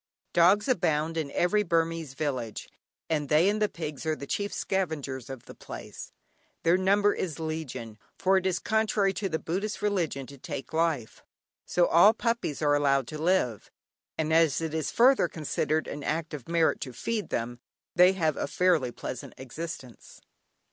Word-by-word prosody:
Dogs 190 +6 +5
abound 165 - +1
in 155 -3 -2
every 180 +8 +2
Burmese 165 -5 -1
village, 130 -7 -3 0.4
and 150 -3 -1
they 155 +4 +5
and 210 +1 +1
the 210 - +3
pigs 155 -5 -6
are 160 -1 0
the 140 - -8
chief 200 +7 -2
scavengers 145 -9 -2
of 130 -3 -8
the - - -11
place. - - -9 0.5
Their 165 +2 +4
number 200 +2 +3
is 170 -5 -3
legion, 155 -9 -5 0.2
for 190 0 +3
it 190 0 0
is 185 -2 +1
contrary 215 -2 +1
to 195 +1 -2
the 160 - 0
Buddhist 195 +7 -3
religion 175 -10 -1
to 140 0 -13
take 135 +2 -7
life, 160 -8 -1 0.5
so 175 - +3
all 175 +7 +6
puppies 230 - -1
are 145 -1 +4
allowed 140 -2 +2
to 155 0 -6
live; 160 - +1 0.5
and 160 0 0
as 160 -3 +4
it 160 -1 -3
is 160 -2 -1
further 255 -5 +5
considered 155 0 -1
an 145 - -6
act 160 +2 -2
of 145 -1 -7
merit 165 -1 +2
to 130 -4 -5
feed 220 - -3
them, 120 +1 -3 0.4
they 180 +2 +7
have 160 -5 0
a - - -2
fairly 165 -5 +2
pleasant 125 - -7
existence. 130 -1 -8
160 Hz, 170 wpm, -28 LUFS, 145-185 Hz, 0.5 s, they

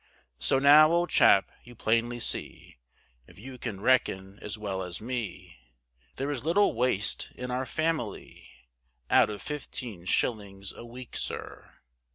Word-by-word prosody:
So 100 - +2
now, 150 +3 +7
old 175 +1 +1
chap, 100 - +5
you 120 0 -14
plainly 115 +2 0
see, 115 - -2 0.5
If - - -18
you 125 +4 -10
can 110 -6 -5
reckon 100 -4 +1
as 105 - -6
well 100 -3 -4
as 90 -1 -3
me, 120 -3 -5 0.6
There 140 +2 -2
is 130 -4 -4
little 190 +6 +3
waste 115 -3 0
in 125 0 -5
our 130 +1 -2
family, 155 -8 -3 0.6
Out - - +5
of 105 -1 -7
fifteen 125 - -7
shillings 100 -1 -1
a - - -10
week, 120 +1 -10
sir. - - -5
120 Hz, 145 wpm, -28 LUFS, 100-135 Hz, 0.6 s, now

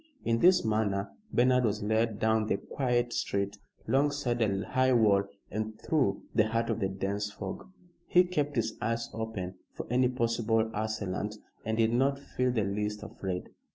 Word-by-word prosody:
In 115 0 +2
this 180 -1 +5
manner 105 -2 0 0.2
Bernard 125 +1 +4
was 105 -2 0
led 110 +1 +1
down 110 0 +2
the 100 - +1
quiet 120 -1 -1
street, 100 +1 -1 0.3
'longside 135 -3 +1
a 100 -2 +1
high 130 0 +2
wall 105 -4 +4 0.3
and 110 +1 -3
through 130 -11 +1
the 110 - +4
heart 115 +1 0
of 115 - -1
the 95 - +1
dense 100 +2 -2
fog. 100 - -7 0.4
He 180 0 +6
kept 150 -5 -1
his 115 -2 0
eyes 115 +1 -1
open 100 -5 -4 0.2
for - - -5
any 125 0 +3
possible 115 -2 +1
assailant, 105 -1 -2 0.3
and 110 0 -1
did 115 0 +3
not 135 +3 +2
feel 125 -2 -1
the 115 -3 +1
least 105 +1 -2
afraid. 95 -2 -5
110 Hz, 165 wpm, -30 LUFS, 105-125 Hz, 0.4 s, He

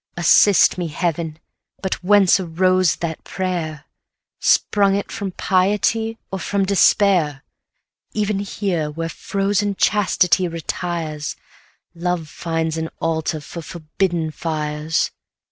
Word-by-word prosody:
Assist 185 +2 +5
me, 175 - -1
Heaven! 160 0 -2 0.5
but 190 -1 -2
whence 200 0 +5
arose 185 0 +2
that 160 -2 -5
prayer? 170 -5 -3 0.5
Sprung 200 -1 +3
it 200 - -3
from 200 -3 -4
piety, 210 +5 +1
or 195 - -3
from 200 +1 0
despair? 185 -7 +3 0.7
180 - - -3
Even 210 -1 0
here, 190 -6 -2
where 165 +2 -4
frozen 200 +2 -1
chastity 185 -3 +2
retires, 165 -2 -4 0.6
Love 170 -2 -2
finds 165 0 -2
an 160 0 -3
altar 160 -1 -1
for 170 +3 -8
forbidden 165 0 -2
fires. 155 -1 -2
175 Hz, 110 wpm, -20 LUFS, 160-195 Hz, 0.7 s, Assist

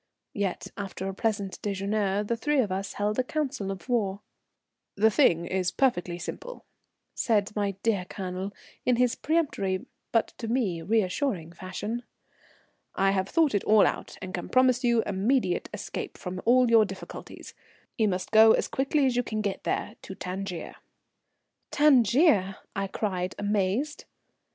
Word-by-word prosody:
Yet, 200 -3 -2
after 195 -1 -5
a 195 - -3
pleasant 200 -2 -2
déjeuner, 200 0 -1
the 235 - 0
three 295 +6 0
of 215 -7 +1
us 195 +1 -3
held 210 +3 -1
a - - +3
council 270 -7 -2
of 195 +3 -6
war. 205 -5 0 0.7
"The 220 +2 +4
thing 170 - +3
is 185 0 0
perfectly 180 -9 0
simple," - - -7 0.5
said 210 -2 +1
my 200 -2 -1
dear 205 -5 +1
Colonel, 185 +1 -5 0.3
in 250 - +3
his 245 0 +2
peremptory, 275 - -1 0.3
but 230 - +2
to 230 - -4
me 220 -8 0
reassuring 190 - 0
fashion. 190 +6 -5 0.9
"I 195 0 +3
have 190 -1 0
thought 320 -6 +3
it 205 - +1
all 215 -1 +6
out - - -3
and 185 0 -6
can 175 - -4
promise 255 0 +3
you 235 -2 +3
immediate 200 -1 0
escape - - -6
from 185 0 -6
all 250 +2 +5
your 225 -1 +7
difficulties. 195 -2 -8 0.4
You 220 - +2
must 185 -2 -2
go 220 0 +8
as - - +1
quickly 275 +2 +1
as 255 -2 +1
you 245 - +3
can 215 -3 -3
get 200 -2 -3
there, - - -2
to 190 - -8
Tangier." 185 -1 -5 0.9
"Tangier!" 245 - +4 0.2
I 195 -1 -1
cried, 185 -2 -2
amazed. 205 +8 -1
205 Hz, 155 wpm, -27 LUFS, 190-240 Hz, 0.9 s, go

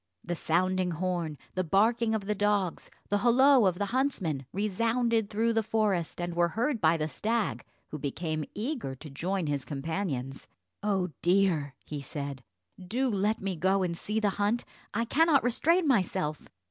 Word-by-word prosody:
The 175 - -3
sounding 185 +3 +1
horn, 170 -2 -2 0.2
the 185 - 0
barking 220 +6 +2
of 205 -3 -3
the 210 - 0
dogs, 205 -3 0 0.2
the 205 - +2
holloa 245 0 +5
of 180 - -5
the 205 - 0
huntsmen, 185 - -1
resounded 225 +3 +1
through 225 +2 +1
the 225 - +2
forest, 210 -7 0
and 175 0 -2
were 170 0 +3
heard 235 - -1
by 165 0 +4
the 155 -1 -1
stag, 220 +6 -1 0.3
who 155 - -6
became 155 +3 -2
eager 225 - -3
to 150 +4 -10
join 180 +5 -2
his 145 -3 -1
companions. 140 -3 -4 0.3
"Oh 195 -3 0
dear," 175 -7 +2
he 150 -2 -5
said, 140 -1 -6 0.4
"do 245 +7 0
let 210 +2 0
me 195 -1 -2
go 190 +3 +2
and 170 -2 -1
see 210 +5 -2
the 210 -2 +2
hunt; 215 +4 +1 0.3
I 230 +2 0
cannot 310 +3 +4
restrain 320 +8 +2
myself." 180 - 0
195 Hz, 165 wpm, -29 LUFS, 165-225 Hz, 0.4 s, holloa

